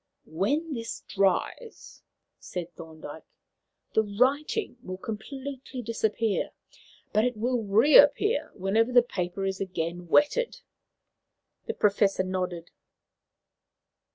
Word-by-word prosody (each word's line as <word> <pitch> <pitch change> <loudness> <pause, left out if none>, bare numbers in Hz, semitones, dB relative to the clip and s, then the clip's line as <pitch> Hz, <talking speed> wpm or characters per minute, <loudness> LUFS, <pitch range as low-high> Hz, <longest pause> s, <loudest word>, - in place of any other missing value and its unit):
"When 285 - -1
this 230 -3 -5
dries," 200 - -1 0.4
said 175 -1 -6
Thorndyke, 160 -1 -10 0.7
"the 220 - +4
writing 260 - 0
will 185 0 -6
completely 260 +4 -7
disappear, 220 -1 -1 0.6
but 215 - +3
it 245 -2 0
will 245 +2 0
reappear 285 - +5
whenever 215 +5 +1
the 245 -1 +6
paper 185 -3 -3
is 190 0 -2
again 175 -2 -3
wetted." 295 - +2 1.1
The 460 - -3
Professor 200 -2 +2
nodded. 180 -2 -4
215 Hz, 100 wpm, -27 LUFS, 185-260 Hz, 1.1 s, the